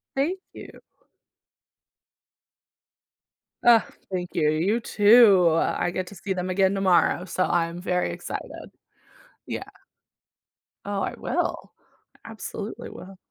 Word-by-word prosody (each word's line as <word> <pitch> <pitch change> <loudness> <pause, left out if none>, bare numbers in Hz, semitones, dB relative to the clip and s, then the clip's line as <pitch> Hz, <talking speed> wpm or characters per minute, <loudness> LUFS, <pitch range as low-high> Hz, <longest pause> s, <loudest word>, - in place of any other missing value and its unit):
Thank 335 +8 0
you. - - -12 2.8
Ugh, 235 -3 +6 0.3
thank 180 -1 -3
you, 150 -2 +2
you 180 +10 +1
too, 205 -5 +6
I 175 - 0
get 185 0 -4
to 200 - -11
see 195 - -3
them 185 0 -4
again 190 +1 +2
tomorrow, 180 -2 +2
so 185 +1 -1
I'm 170 0 -1
very 180 -1 -1
excited. - - -7 0.8
Yeah. - - -5 1.2
Oh, 200 -1 -2
I - - -2
will. - - -3 0.5
I 225 - -9
absolutely 215 0 -7
will. 190 +1 -12
190 Hz, 115 wpm, -25 LUFS, 180-205 Hz, 2.8 s, Ugh